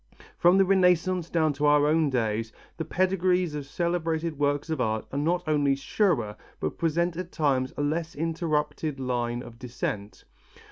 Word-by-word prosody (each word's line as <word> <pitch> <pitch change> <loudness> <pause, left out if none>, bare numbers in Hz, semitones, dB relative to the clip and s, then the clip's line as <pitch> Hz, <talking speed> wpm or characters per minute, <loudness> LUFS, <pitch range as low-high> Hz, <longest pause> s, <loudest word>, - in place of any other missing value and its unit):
From 175 +2 +4
the 195 - +5
Renaissance 180 -2 +2
down 160 -3 +2
to 145 +1 0
our 145 0 +5
own 155 0 +3
days 115 -3 -1 0.3
the 165 - -2
pedigrees 185 -1 +1
of 145 -2 -5
celebrated 165 -1 -1
works 145 +2 0
of 155 -5 -1
art 110 -2 -1
are 140 - -2
not 170 +4 0
only 145 -3 +2
surer, 135 - 0 0.2
but 75 - -3
present 170 +1 +1
at 180 -1 -5
times 135 -4 +1
a 145 - 0
less 160 +3 -2
interrupted 155 -2 -2
line 120 -1 -2
of 115 0 -12
descent. 110 -4 -5
150 Hz, 160 wpm, -27 LUFS, 135-170 Hz, 0.3 s, the